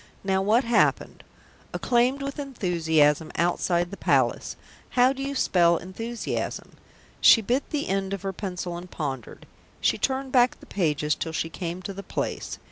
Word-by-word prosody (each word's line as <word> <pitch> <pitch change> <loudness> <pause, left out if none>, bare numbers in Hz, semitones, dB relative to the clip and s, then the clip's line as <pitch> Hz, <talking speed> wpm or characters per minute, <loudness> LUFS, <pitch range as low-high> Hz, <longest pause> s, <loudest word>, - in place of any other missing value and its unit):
"Now 190 -1 +1
what 220 +6 +3
happened? 235 0 +1 0.5
Acclaimed 250 +3 +1
with 275 +1 -5
enthusiasm 160 - +1
outside 175 0 +1
the 200 - -7
Palace - - +1 0.4
how 250 +2 +5
do 270 - -7
you 280 +1 -3
spell 170 -8 +3
'enthusiasm'?" 225 +7 -5 0.5
She - - +8
bit 245 +6 -1
the 295 -1 -2
end 195 0 -1
of 200 -1 -4
her 195 0 -3
pencil 180 -2 -5
and 180 +1 -9
pondered. 135 -7 -5 0.3
She - - +1
turned 265 0 -1
back 250 -1 +3
the - - -14
pages 150 -5 0
till 160 - -4
she 165 +1 -2
came 175 +1 -5
to 195 - -5
the 195 - -7
place. - - -4
195 Hz, 160 wpm, -25 LUFS, 170-245 Hz, 0.5 s, She